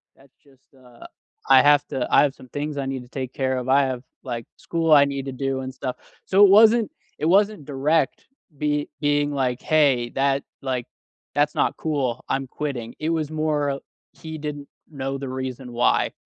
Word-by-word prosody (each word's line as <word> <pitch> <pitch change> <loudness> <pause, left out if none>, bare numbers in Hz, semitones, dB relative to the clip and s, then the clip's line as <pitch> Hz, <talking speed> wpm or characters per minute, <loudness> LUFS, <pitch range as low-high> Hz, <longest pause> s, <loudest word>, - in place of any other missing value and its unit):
that's 135 -1 -23
just, 135 -2 -24 0.2
uh, 125 -2 -16 0.4
I 130 -1 +8
have 145 0 +5
to 130 -2 -2
I - - +7
have 140 -1 0
some 130 - -15
things 145 +2 -4
I 140 - -2
need 135 -1 -3
to 125 - -18
take 130 -1 -5
care 130 -1 -1
of 125 0 -4
I 140 +1 +5
have, 130 -1 -4 0.2
like, 120 -3 -5
school 165 -1 -1
I 140 -1 +7
need 140 -1 -4
to 135 - -4
do 135 0 -2
and 130 0 -6
stuff” 130 -1 -4 0.3
so 195 +2 +5
it 195 - +5
wasn't 220 +2 +6 0.3
it - - -1
wasn't 200 -1 +3
direct 145 +2 0 0.3
be 150 0 -1
being 145 0 +1
like, 130 -3 -1
hey 140 -6 +2
that, 140 0 +1 0.2
like 130 -3 -2 0.5
that's 145 +1 +2
not - - +1
cool 135 -6 -2
I'm 135 0 -1
quitting, 125 -5 -5
it 155 - -2
was 160 -2 -1
more 150 -3 -1 0.3
he 160 -1 -8
didn't 145 -1 -6 0.2
know 135 -1 -4
the 135 -1 -6
reason 130 -1 -5
why. 120 - +2
140 Hz, 190 wpm, -23 LUFS, 130-150 Hz, 0.5 s, I